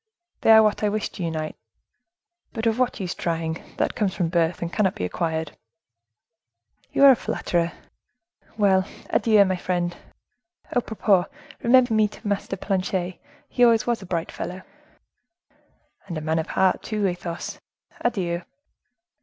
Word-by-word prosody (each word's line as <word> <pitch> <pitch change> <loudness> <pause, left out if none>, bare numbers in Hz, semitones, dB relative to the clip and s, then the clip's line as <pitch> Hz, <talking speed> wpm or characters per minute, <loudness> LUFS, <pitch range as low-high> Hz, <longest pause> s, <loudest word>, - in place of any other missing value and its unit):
They - - +2
are 220 0 +9
what 215 -1 +1
I 210 - +2
wish 210 0 -2
to 185 - -7
unite! 160 -2 -3 1.0
But, 225 -1 -3
of 225 +1 +1
what 250 -2 +1
use 180 -2 -3
trying! 165 -1 -3
that - - 0
comes 200 -4 -1
from 175 -3 0
birth, 170 0 0
and 170 - -5
cannot 200 -4 +1
be 90 - -2
acquired." 160 - -2 1.4
"You - - +2
are 275 - +11
a - - +5
flatterer! 170 -6 -1 0.9
Well! 190 -3 +3 0.2
adieu, 215 -3 +5
dear 185 -1 0
friend. 175 -1 -1 0.8
A 245 - +2
propos, 205 -5 +2 0.4
remember 245 0 +5
me 215 -1 +4
to 210 - -10
Master 200 -1 -2
Planchet; 185 -2 -2 0.3
he 245 - +1
always 230 -2 +5
was 235 -3 0
a 190 - -10
bright 170 -1 -2
fellow." 185 +1 -6 1.4
"And 170 -4 -4
a - - -4
man 160 +1 0
of 160 - -3
heart, 190 -1 +2
too, 210 -2 -2
Athos. 175 -2 -4 0.4
Adieu." 180 -7 -1
190 Hz, 155 wpm, -24 LUFS, 170-215 Hz, 1.4 s, are